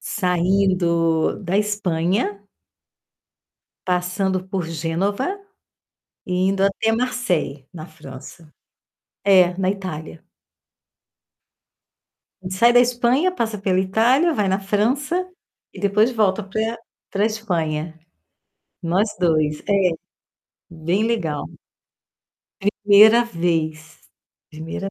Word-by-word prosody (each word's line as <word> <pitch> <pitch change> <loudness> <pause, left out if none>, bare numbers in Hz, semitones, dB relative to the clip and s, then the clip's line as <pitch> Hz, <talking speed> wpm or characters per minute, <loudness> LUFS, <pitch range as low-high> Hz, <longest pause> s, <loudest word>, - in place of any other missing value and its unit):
saindo 180 -3 +1
da 185 +2 -1
Espanha 205 0 -1 1.4
passando 185 +1 -1
por 190 -3 -3
Génova 190 - -2 0.9
e 180 - -3 0.2
indo 195 0 0
até 200 +3 +1
Marseille, 190 - -2
na 160 -3 -8
França. 150 +1 -12 0.7
É, 185 -3 +5
na 190 -1 +1
Itália. 165 -5 -6 2.3
Sai 210 +6 +3
da 245 - +6
Espanha, 245 +7 +2
passa 225 - -2
pela 190 -2 +1
Itália, 235 - +2
vai 210 -9 0
na 190 +1 +1
França 255 - -1 0.5
e - - -9
depois 210 +4 +2
volta 215 -4 +1
pra 220 +4 -3 0.3
pra 200 +1 0
Espanha. 165 -7 -3 0.8
Nós 180 +6 +1
2, 155 -4 +1
é. 195 -3 +3 0.8
Bem 170 +5 -1
legal. 170 -11 -2 1.2
1ª 210 +3 +5
vez. 160 -6 -2 0.5
1ª 160 +5 -6
190 Hz, 90 wpm, -21 LUFS, 170-215 Hz, 2.3 s, da